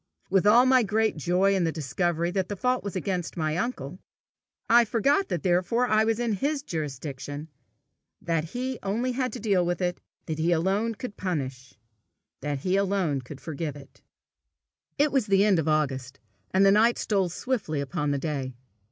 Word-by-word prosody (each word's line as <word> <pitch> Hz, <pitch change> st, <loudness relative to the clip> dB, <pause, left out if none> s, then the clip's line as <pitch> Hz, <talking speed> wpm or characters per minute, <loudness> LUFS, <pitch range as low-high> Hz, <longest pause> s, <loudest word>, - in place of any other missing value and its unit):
With 195 Hz, +1 st, +3 dB
all 235 Hz, +4 st, +7 dB
my 260 Hz, -1 st, +5 dB
great 220 Hz, 0 st, +1 dB
joy 180 Hz, +6 st, +2 dB
in 190 Hz, -2 st, +1 dB
the 165 Hz, -, +1 dB
discovery 170 Hz, +3 st, -1 dB
that 190 Hz, -1 st, -1 dB
the 205 Hz, -, -3 dB
fault 250 Hz, +5 st, 0 dB
was 200 Hz, -1 st, -5 dB
against 185 Hz, -3 st, -3 dB
my 155 Hz, -1 st, 0 dB
uncle, 180 Hz, -, -3 dB, 0.7 s
I 240 Hz, +1 st, +6 dB
forgot 275 Hz, -, +1 dB
that 170 Hz, -, -2 dB
therefore 185 Hz, +7 st, +2 dB
I 215 Hz, -1 st, +3 dB
was 225 Hz, -1 st, +1 dB
in 235 Hz, -2 st, 0 dB
his 280 Hz, +7 st, -1 dB
jurisdiction, 145 Hz, -, -5 dB, 0.7 s
that 165 Hz, -2 st, -1 dB
he 250 Hz, +7 st, -4 dB
only 225 Hz, +6 st, -1 dB
had 255 Hz, 0 st, -1 dB
to -, -, -5 dB
deal 200 Hz, -4 st, +2 dB
with 175 Hz, 0 st, -1 dB
it, 175 Hz, -1 st, -1 dB, 0.3 s
he 160 Hz, +1 st, 0 dB
alone 195 Hz, +7 st, +1 dB
could 245 Hz, -2 st, -7 dB
punish, 135 Hz, -8 st, -4 dB, 0.7 s
as 145 Hz, -1 st, -3 dB
he 185 Hz, +1 st, +2 dB
alone 190 Hz, -8 st, 0 dB
could 130 Hz, +2 st, -10 dB
forgive 155 Hz, -2 st, -4 dB
it. 140 Hz, -1 st, -14 dB, 1.0 s
It 290 Hz, 0 st, +3 dB
was 265 Hz, -5 st, +1 dB
the 195 Hz, 0 st, +4 dB
end 195 Hz, -5 st, +4 dB
of 160 Hz, -, -1 dB
August, 140 Hz, -4 st, -1 dB, 0.3 s
and 190 Hz, +1 st, +3 dB
the 195 Hz, -, +6 dB
night 225 Hz, +4 st, +4 dB
stole 195 Hz, -4 st, 0 dB
swiftly 195 Hz, -, -2 dB
upon 140 Hz, +1 st, -2 dB
the 140 Hz, -, +1 dB
day. 135 Hz, -3 st, -3 dB
185 Hz, 180 wpm, -26 LUFS, 155-220 Hz, 1.0 s, all